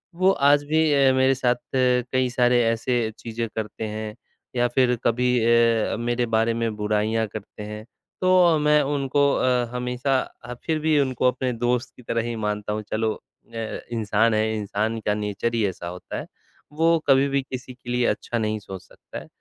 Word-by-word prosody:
वो 185 +2 +4
आज 145 -2 +4
भी 155 +2 +1
अ, 135 -1 +5
मेरे 130 0 +3
साथ 125 -1 +1 0.2
कई 125 0 +2
सारे 125 0 +3
ऐसे 115 0 0
चीज़ें 115 0 -4
करते 110 0 -4
हैं, 110 0 -5 0.4
या 120 0 +2
फिर 125 0 +2
कभी 125 +2 +1 0.2
अ, 115 -1 +3
मेरे 120 +1 0
बारे 115 +1 +2
में 115 -1 -2
बुराइयाँ 105 +1 0
करते 105 0 -9
हैं, 105 +1 -7 0.4
तो 180 -3 +5
मैं 150 0 +4
उनको 140 0 +1
अ, 125 -1 +2
हमेशा 125 +2 0
अ, 120 0 -9
फिर 160 -2 0
भी 155 -1 +2
उनको 130 -2 +1
अपने 125 0 0
दोस्त 120 +1 -1
की - - -15
तरह 115 0 -1
ही 120 - -3
मानता 105 0 -2
हूँ 110 - -3
चलो 110 0 0
अ, 115 -1 -8
इंसान 110 0 +1
है, 110 0 +1
इंसान 105 +2 -2
का 105 - +2
नेचर 105 +2 -2
ही 110 - +1
ऐसा 90 -2 -6
होता 90 +1 -7
है, - - -7 0.5
वो 165 +2 +3
कभी 135 0 +5
भी 140 0 +1
किसी 130 -1 -8
के 125 0 -13
लिए 125 0 +1
अच्छा 120 - -2
नहीं 110 -1 -1
सोच 95 -2 -9
सकता - - -11
है, - - -13
120 Hz, 185 wpm, -24 LUFS, 110-130 Hz, 0.5 s, अ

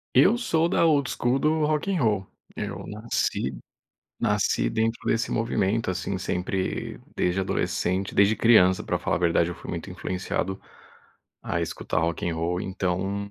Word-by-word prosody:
Eu 240 - +6
sou 165 -9 +1
da 170 - +2
old 145 -5 +3
school 125 +3 +1
do 155 +1 +2
Rock 155 +5 0
and 185 -5 +1
Roll. 105 -4 +1 0.3
Eu - - -5
nasci 105 - -2 0.6
nasci - - +1
dentro 115 +1 0
desse 115 0 +1
movimento, 115 -2 0
assim, 95 +1 -2
sempre, 95 +1 -2 0.2
desde 90 +2 +1
adolescente 95 0 -1
desde 100 +2 +4
criança, 95 -5 +5
pra - - -1
falar - - 0
a - - -1
verdade. 85 -1 +2
Eu 90 - -4
fui - - -8
muito - - -5
influenciado 95 +1 -3 0.8
a 85 - -2
escutar 80 -1 -2
Rock 85 +1 -1
and 85 - -1
Roll, 85 +2 -1
então, 95 +1 -2
100 Hz, 160 wpm, -26 LUFS, 90-115 Hz, 0.8 s, Eu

